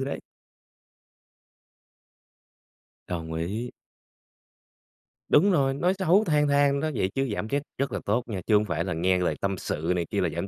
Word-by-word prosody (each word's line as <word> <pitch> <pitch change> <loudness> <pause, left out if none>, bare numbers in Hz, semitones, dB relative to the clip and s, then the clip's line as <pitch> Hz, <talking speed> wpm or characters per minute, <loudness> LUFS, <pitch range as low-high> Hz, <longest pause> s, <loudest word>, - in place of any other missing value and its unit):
Ừ, 135 - -1
đấy. 140 - -4 2.9
Đồng 80 -2 -4
ý. 100 +9 -3 1.6
Đúng 195 +7 +5
rồi, 135 -6 +2
nói 175 +7 +1
xấu 190 +2 +4
than 150 -5 +2
than 140 0 +3
đó 155 - -1
vậy 95 - 0
chứ 135 -2 0
giảm 105 - -3
stress 140 +3 0 0.2
rất 140 0 -1
là - - -2
tốt 110 +4 +1
nha, 100 -5 -4
chứ 110 - +4
hổng 105 +1 +3
phải 85 -4 -1
là 90 -2 -3
nghe 90 +3 +2
lời 85 -4 0
tâm 100 -1 -1
sự 80 0 -2
này 85 -1 -1
kia - - -1
là - - +1
giảm 100 - -4
115 Hz, 180 wpm, -26 LUFS, 90-140 Hz, 2.9 s, Đúng